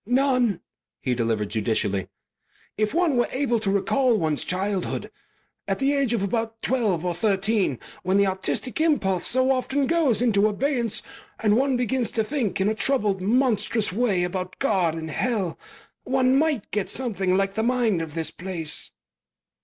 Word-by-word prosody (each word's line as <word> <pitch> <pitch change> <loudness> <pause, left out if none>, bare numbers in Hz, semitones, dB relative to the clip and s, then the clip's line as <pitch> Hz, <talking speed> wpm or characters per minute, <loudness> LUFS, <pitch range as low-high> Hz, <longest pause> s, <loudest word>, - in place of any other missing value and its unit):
"None," 250 -5 +2 0.4
he 125 - -1
delivered 115 -3 -1
judicially. 105 -3 -1 0.7
"If 215 0 0
one 330 -5 +2
were 240 - +2
able 255 -4 0
to 215 -2 -1
recall 235 +5 +2
one's 155 -5 0
childhood 190 0 -2 0.6
at - - 0
the 275 +1 +1
age 275 -4 +1
of 230 -5 0
about 225 +2 -2
twelve 210 -10 0
or 175 - 0
thirteen 195 - +1 0.2
when 185 +2 +1
the 200 - +4
artistic 195 +7 -1
impulse 195 - +1
so 260 +1 +2
often 265 +2 0
goes 310 -8 +2
into 215 -4 +3
abeyance 235 +1 0 0.4
and 210 -1 +3
one 265 +1 +2
begins 245 0 -1
to 220 - +1
think 215 - -2
in 190 - +2
a 215 - +2
troubled, 215 -5 +1
monstrous 225 -2 +1
way 205 -5 +1
about 185 +1 -4
God 180 -11 +1
and 160 -1 -5
Hell, 205 -5 -1 0.4
one 260 0 +2
might 295 -6 +1
get 210 -3 -1
something 195 -7 0
like 195 0 0
the 220 - -1
mind 235 -6 +1
of 160 -1 -6
this 160 -1 -1
place." 175 -4 -2
215 Hz, 160 wpm, -24 LUFS, 185-255 Hz, 0.7 s, the